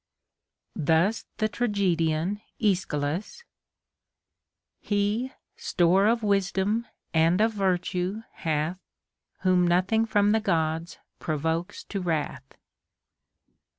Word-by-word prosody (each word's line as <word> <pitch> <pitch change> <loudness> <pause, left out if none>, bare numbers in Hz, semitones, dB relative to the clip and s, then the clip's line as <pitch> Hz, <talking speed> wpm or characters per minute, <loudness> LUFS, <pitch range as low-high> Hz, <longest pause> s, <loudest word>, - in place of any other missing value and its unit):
Thus 165 +8 +2
the 215 - +1
tragedian 195 -5 0 0.2
Aeschylus: 185 - -1 0.7
— - - -61 0.7
He 210 +5 0 0.3
store 185 +4 +3
of 230 0 +2
wisdom 200 +3 +1 0.3
and 165 +3 +3
of 220 +1 +3
virtue 185 +1 -1
hath, 160 +3 -2 0.6
Whom 185 -2 +3
nothing 190 +6 +2
from 205 -1 +3
tlie 220 - +2
Gods 165 -3 -1 0.2
provokes 160 +3 -2
to 200 - -4
wrath. 150 -6 -3
185 Hz, 90 wpm, -26 LUFS, 165-210 Hz, 0.7 s, store